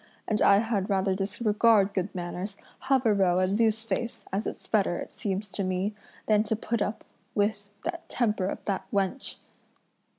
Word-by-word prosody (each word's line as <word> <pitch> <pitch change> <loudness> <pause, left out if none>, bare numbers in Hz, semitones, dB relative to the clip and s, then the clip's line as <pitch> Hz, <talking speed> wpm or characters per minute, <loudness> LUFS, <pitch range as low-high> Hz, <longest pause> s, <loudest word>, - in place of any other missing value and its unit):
and 215 -1 0
I 200 - +7
had 210 -3 0
rather 190 -1 +2
disregard 205 +1 +3
good 190 0 -2
manners, 180 +3 -4 0.3
have 265 -2 +4
a 220 - +5
row 185 -3 +3
and 185 +3 +2
lose 220 -1 +3
face, 235 +1 -3
as 200 +3 0
it's - - -6
better, 195 -5 +2
it - - -6
seems 205 -1 -3
to 200 - -3
me, 185 +3 -1 0.3
than 210 -1 +4
to 220 - 0
put 225 +1 -2
up 205 - -2 0.3
with 205 -1 0
the 340 +1 -2
temper 210 -6 0
of - - -5
that 195 -2 -2
wench!" 200 +6 -1
205 Hz, 175 wpm, -28 LUFS, 195-220 Hz, 0.3 s, I